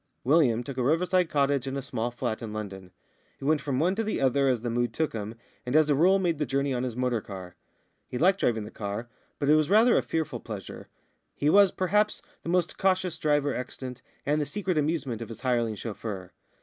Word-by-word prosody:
William 125 -4 +3
took 135 +1 -7
a 125 - +1
riverside 175 +5 +2
cottage 140 -2 +1
and 135 +1 -3
a - - -2
small 120 -3 -2
flat 120 -2 -3
in 115 -2 -5
London. 100 -3 -6 0.5
He - - -8
went 150 0 +2
from 135 -3 -1
one 175 +5 +2
to 225 +3 -1
the 215 - -2
other 135 +1 +3
as 125 -4 +1
the 120 -1 -2
mood 120 -1 -1
took 160 -1 0
him, 110 0 -5 0.3
and 125 +2 -3
as 155 -1 +5
a - - +4
rule 180 +7 +5
made 170 -5 0
the 150 - +1
journey 140 0 0
on 125 - -1
his 125 -3 -3
motor 125 -2 0
car. 95 -3 -9 0.5
He 125 - -4
liked 185 +7 +3
driving 110 -3 +1
the 105 - -9
car, 105 +3 -5 0.3
but 140 - -2
it 150 - +6
was 155 0 +3
rather 225 +4 +6
a - - 0
fearful 155 -6 -2
pleasure. 105 -5 -8 0.5
He 145 +2 +2
was, 200 +1 +7
perhaps, 210 +4 +1 0.2
the - - -6
most 175 -1 0
cautious 185 -2 +1
driver 145 -2 +2
extant, 125 0 -6 0.2
and 150 +2 +1
the 145 - -2
secret 195 -3 -2
amusement 150 -6 -1
of 115 - -6
his 115 -1 -9
hireling 120 -4 +1
chauffeur. 105 -3 -6
135 Hz, 225 wpm, -27 LUFS, 115-160 Hz, 0.5 s, was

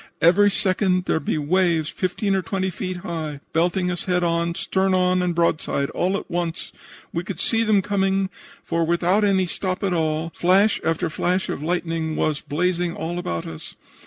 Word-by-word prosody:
Every 195 +5 +5
second 185 -2 +1
there'd 160 - 0
be - - 0
waves 165 +1 +2
15 195 +2 -1
or 190 - +1
20 190 -2 -2
feet 185 +1 -4
high, 155 -4 -4
belting 180 +2 +1
us 175 - -3
head 180 -1 +1
on, 170 0 0
stern 190 +1 +1
on 185 0 +2
and 175 -1 0
broadside, 160 -4 0
all 190 +2 0
at - - -7
once. 175 -1 -3 0.4
We 170 - -1
could 190 +1 -6
see 225 -1 +1
them 215 -3 +3
coming, 195 -1 0 0.3
for 170 0 0
without 170 +5 +2
any 195 -2 +3
stop 185 +2 -3
at 195 -2 +1
all 160 0 0
flash 195 +4 +3
after 165 +2 0
flash 180 +3 0
of - - -3
lightning 165 -1 -1
was 150 -2 0
blazing 175 +3 -1
all 170 +2 -3
about 85 - -3
us. 80 -1 -9
180 Hz, 180 wpm, -23 LUFS, 165-190 Hz, 0.4 s, Every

